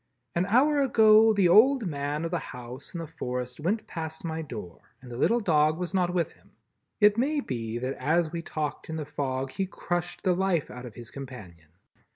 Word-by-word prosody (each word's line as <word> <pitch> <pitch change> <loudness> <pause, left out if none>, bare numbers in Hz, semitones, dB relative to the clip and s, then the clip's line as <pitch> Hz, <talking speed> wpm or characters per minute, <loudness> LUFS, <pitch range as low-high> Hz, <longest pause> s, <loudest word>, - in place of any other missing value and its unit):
"An 175 +2 0
hour 280 +7 +4
ago 220 -4 +6
the 200 -4 +3
old 235 +7 +6
man 145 -1 -2
of 165 - -3
the 175 - 0
house 125 +5 -9
in - - -3
the 165 - -4
forest 125 -5 -5
went 205 +8 -1
past 160 -1 -6
my 160 0 -3
door 110 - -8 0.2
and 125 -2 -12
the - - -6
little 235 - +3
dog 155 -6 +3
was 180 +1 -4
not 180 -2 +2
with 170 -2 0
him. - - -24 0.5
It 210 +1 +5
may 290 +4 +1
be 115 - -4
that 130 +2 -2
as 160 +4 +1
we 170 -1 -3
talked 155 -2 -4
in 160 - -3
the 155 -2 -4
fog 135 -2 -3
he 190 +5 -2
crushed 175 -2 -4
the 185 -2 +3
life 180 -4 0
out 125 0 -8
of 115 - -12
his 120 -2 -9
companion. 100 - -10
160 Hz, 205 wpm, -27 LUFS, 130-190 Hz, 0.5 s, ago